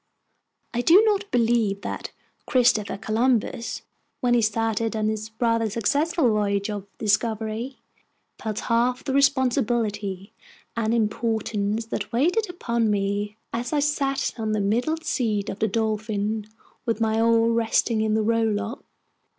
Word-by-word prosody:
I 240 - 0
do 350 - +6
not 415 -1 +1
believe 230 -4 +1
that - - -5 0.4
Christopher 235 -6 +2
Columbus, 230 +2 0 0.4
when 245 -2 +2
he 240 - +4
started 225 +1 0
on 215 0 0
his 215 0 -3
rather 230 -2 +2
successful 285 - +1
voyage 205 -1 0
of 200 -1 -5
discovery, 220 +3 -1 0.6
felt 215 -2 -3
half 245 +2 +1
the 270 - -2
responsibility 235 -8 +1 0.4
and 225 -1 0
importance 220 -1 0
that 215 -1 -4
weighed 355 - +1
upon 235 -10 -1
me 205 +1 -1 0.2
as 240 +5 -3
I 295 - +3
sat 280 -3 0
on 215 -1 -1
the 215 - 0
middle 235 +10 +1
seat 230 -10 -1
of 195 - -5
the 220 - +2
Dolphin, 215 0 -1 0.4
with 230 -2 -1
my 220 0 +1
oar 230 0 +4
resting 230 -1 +1
in 220 0 +1
the 220 - +2
row 230 +1 +2
lock. 220 +2 -2
225 Hz, 140 wpm, -24 LUFS, 215-245 Hz, 0.6 s, do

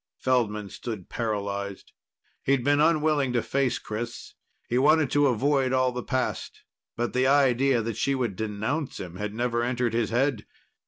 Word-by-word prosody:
Feldman 105 -6 0
stood 110 -7 -7
paralyzed. 100 -3 -3 0.5
He'd 135 -2 +1
been 145 +2 +3
unwilling 155 -4 +2
to 120 - +1
face 135 -2 0
Chris. 115 +2 -6 0.3
He 120 - +1
wanted 150 +1 +4
to 145 0 +4
avoid 135 +1 +1
all 130 -1 +2
the 125 0 -4
past. 130 +1 -3 0.3
But 120 0 -1
the 130 +1 +2
idea 135 -3 +3
that 115 -2 -4
she 140 - +1
would 120 -7 -2
denounce 110 - -3
him 90 -1 -7
had 105 +1 -4
never 120 0 0
entered 120 -1 0
his 115 -2 0
head. 120 -1 0
125 Hz, 160 wpm, -26 LUFS, 110-135 Hz, 0.5 s, wanted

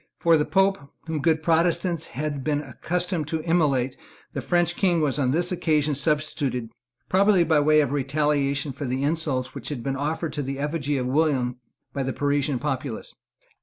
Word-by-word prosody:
For 170 -1 +4
the 150 -1 +2
Pope, 195 0 +2 0.3
whom 160 -2 -2
good 160 +1 +2
Protestants 170 0 +1
had 145 0 -4
been 150 0 0
accustomed 175 +4 -2
to 160 0 -2
immolate, 145 -7 +1 0.4
the - - -3
French 175 -1 +1
King 180 -4 +2
was 150 -2 +1
on 130 -3 +2
this 175 +6 +2
occasion 155 -4 +1
substituted, 140 -5 -1 0.4
probably 195 -1 +4
by 160 -2 +3
way 155 +1 +5
of 140 -3 -1
retaliation 140 0 0
for 140 +2 -6
the 130 +2 -2
insults 145 -4 0
which - - -6
had 135 -6 -5
been 135 -1 -2
offered 155 +3 -2
to 145 - -2
the 135 0 -4
effigy 145 0 -1
of 125 - -1
William 130 -3 +1 0.4
by 140 - -2
the 135 0 -2
Parisian 145 -1 0
populace. 135 -3 -4
150 Hz, 175 wpm, -25 LUFS, 135-165 Hz, 0.4 s, way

